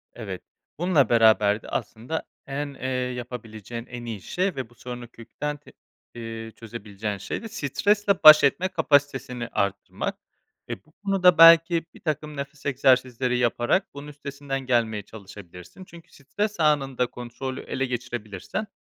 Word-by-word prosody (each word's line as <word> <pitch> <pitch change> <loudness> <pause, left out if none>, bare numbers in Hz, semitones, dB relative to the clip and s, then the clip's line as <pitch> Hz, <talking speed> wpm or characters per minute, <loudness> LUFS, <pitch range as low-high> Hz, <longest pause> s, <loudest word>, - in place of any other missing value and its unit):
Evet, 100 -6 -6 0.4
bununla 165 -8 +3
beraber 110 -2 +4
de, - - -11
aslında, 125 +9 -4 0.2
en, 140 +1 -4
eee, 130 -1 -5
yapabileceğin 120 -3 -5
en 120 -1 -8
iyi 110 -4 -5
şey 185 - -1
ve 130 -4 -5
bu 120 - -22
sorunu 125 0 -8
kökten, 145 +6 -6
t 145 - -18 0.4
eee, 115 -1 -7
çözebileceğin 105 -2 -6
şey 100 - -5
de - - -5
stresle 205 - +1
baş 155 0 +11
etme 170 +6 +3
kapasitesini 140 -7 +1
arttırmak. 100 -3 -2 0.5
Eee, - - -4
bu 155 - -25
konuda, 185 -4 +4
belki, 165 0 +7
birtakım 150 -2 -4
nefes 140 +1 -7
egzersizleri 130 -2 +2
yaparak 120 - +1
bunun 145 +1 -9
üstesinden 140 -1 -5
gelmeye 115 -4 +1
çalışabilirsin. 95 - -12
Çünkü 170 -2 -15
stres 205 +8 -4
anında 135 -5 +2
kontrolü 125 +2 -6
ele 135 - -2
geçirebilirsen, 120 - -5
130 Hz, 135 wpm, -25 LUFS, 115-150 Hz, 0.5 s, baş